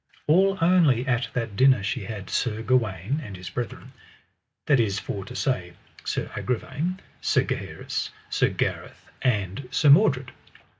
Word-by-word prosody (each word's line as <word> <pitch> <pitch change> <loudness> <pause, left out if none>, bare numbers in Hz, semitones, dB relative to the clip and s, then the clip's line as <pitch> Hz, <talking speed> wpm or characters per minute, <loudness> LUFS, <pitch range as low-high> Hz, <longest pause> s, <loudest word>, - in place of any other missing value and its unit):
All 190 +5 +4
only 165 -8 +4
at 120 -2 0
that 115 -4 -3
dinner 130 -2 +5
she 100 - -2
had 105 -5 -6
Sir 115 -2 -1
Gawaine 120 - 0
and 100 -7 -8
his 90 -1 -8
brethren, 120 -3 -5 0.7
that 140 -4 +4
is 105 -4 +1
for 100 -1 -4
to 125 - -9
say 90 -11 -1 0.3
Sir - - -3
Agravaine, 145 +9 -2 0.2
Sir - - +2
Gaheris, - - -4 0.2
Sir - - +2
Gareth, - - -3
and 105 +1 -1
Sir 140 +3 +4
Mordred. 140 - +4
125 Hz, 145 wpm, -25 LUFS, 105-140 Hz, 0.7 s, dinner